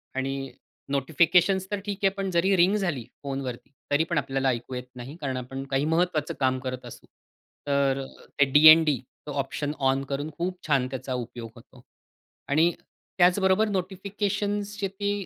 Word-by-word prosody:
आणि 135 0 -3 0.4
नोटिफिकेशन्स 170 +7 +3
तर 205 - -1
ठीक 200 -2 -3
आहे. 195 - +6
पण 195 -1 -3
जरी 185 +3 +3
रिंग 180 +4 +4
झाली 175 - -1 0.2
फोनवरती 135 -2 -5 0.2
तरी 145 +2 +3
पण 165 0 -2
आपल्याला 135 -1 0
ऐकू 120 +1 -3
येत 125 - -4
नाही, 125 +4 -8
कारण 130 -2 -2
आपण 135 +2 -6
काही 135 +2 +1
महत्त्वाचं 160 -2 0
काम 130 -1 +1
करत 130 -1 -5
असू. - - -11 0.6
तर 140 -1 +1 0.4
ते 140 - +7
डी-एन-डी 155 -1 +7 0.3
तो - - -4
ऑप्शन 145 +2 -4 0.2
ऑन 135 +1 -1
करून 145 +2 -3
खूप 180 +2 -2
छान 135 -4 +2
त्याचा 130 -1 -5
उपयोग 120 -2 -6
होतो. 120 +1 -17 0.6
आणि 160 +4 +3 0.5
त्याचबरोबर 190 +3 +4
नोटिफिकेशन्सचे 200 +1 -2
ते 200 0 -3
150 Hz, 155 wpm, -26 LUFS, 135-190 Hz, 0.6 s, ते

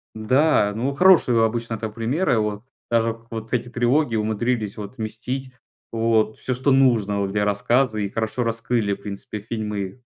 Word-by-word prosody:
Да, 120 0 +3
ну, 130 +6 -2
хорошие 165 -10 +5
обычно 115 0 -1
так 110 0 -5
примеры, 120 - 0
вот. 105 0 -2 0.3
Даже 115 -1 +1
вот 110 0 -6
эти 125 -1 -1
трилогии 120 +2 +1
умудрились 110 0 -1
вот 105 +3 -7
вместить 125 +4 -5 0.4
вот 115 -1 +1
всё, 130 - -2
что 130 +3 +1
нужно 115 -7 +3
вот 100 -1 -1
для 105 +1 0
рассказа, 110 +3 +1
и 100 -1 -1
хорошо 110 +4 -2
раскрыли, 115 -2 0
в 100 - -8
принципе, 100 +1 -6
фильмы. 105 0 -4
115 Hz, 160 wpm, -23 LUFS, 105-125 Hz, 0.4 s, хорошие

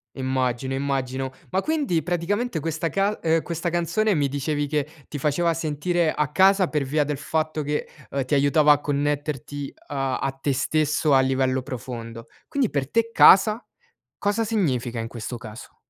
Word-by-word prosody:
Immagino, 130 -1 -1
immagino. 135 -1 -2 0.2
Ma 190 +1 0
quindi 285 - 0
praticamente 180 +5 -1
questa 165 +2 -2
cas 200 +4 0
uhm, 165 0 +3
questa 170 +1 -3
canzone 175 +6 +1
mi 145 -5 +1
dicevi 145 +2 -2
che 150 0 -1 0.2
ti 150 - -6
faceva 155 +4 +1
sentire 160 +2 0
a 150 -1 0
casa 190 +2 +4
per 150 -3 -1
via 145 +3 +1
del 145 0 -3
fatto 155 +1 -2
che, 150 +1 -2 0.2
uhm, 140 -1 -1
ti 130 - -3
aiutava 145 +2 +4
a 145 - -1
connetterti 145 -1 -2
a 135 -2 -1
a 135 - -1
te 135 +1 -2
stesso 150 +2 +1
a - - +6
livello 130 0 +1
profondo, 115 -2 -7 0.2
quindi 280 -7 0
per 140 -2 -2
te 230 0 +2
casa 215 +4 +6 0.5
cosa 205 +3 0
significa 135 - -1
in 115 0 -3
questo 120 +1 -6
caso? 110 0 -11
150 Hz, 165 wpm, -24 LUFS, 135-170 Hz, 0.5 s, a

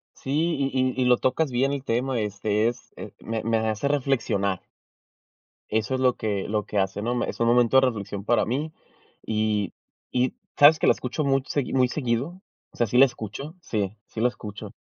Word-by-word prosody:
Sí, 135 - -8 0.3
y 135 -1 0 0.3
y 130 - +1
y - - +3
lo 125 0 +5
tocas 140 +3 +1
bien 130 +3 +1
el 140 -1 -3
tema, 125 +1 0
este, 105 +1 0
es 120 0 -7
eh, - - -8
me 110 0 -3
me 115 0 +1
hace 110 +4 -1
reflexionar. 120 -9 0 1.1
Eso 110 +4 0
es 130 - -1
lo 125 -1 +3
que 100 -3 -2
lo 105 -1 -1
que 105 - -2
hace, 95 +1 0
¿no? 120 +3 -1
Me 120 - -1
es - - -11
un 115 - +3
momento 120 +1 +4
de 130 - +3
reflexión 100 -4 -4
para 120 +2 +3
mí 145 +7 -2 0.5
y 105 -3 0 0.4
y 125 0 0 0.2
¿sabes 150 +2 +8
que - - +2
la - - +8
escucho 130 +5 -3
much 135 -1 +1
segui 145 -3 -1
muy 130 -1 +4
seguido?, 135 +7 -2 0.3
o - - -18
sea 120 - +2
sí 125 - +2
la 135 - +9
escucho. 125 - -7
Sí. 105 - -3
Sí 110 - -6
la 120 - +4
escucho. 105 -4 -8
120 Hz, 205 wpm, -25 LUFS, 110-135 Hz, 1.1 s, la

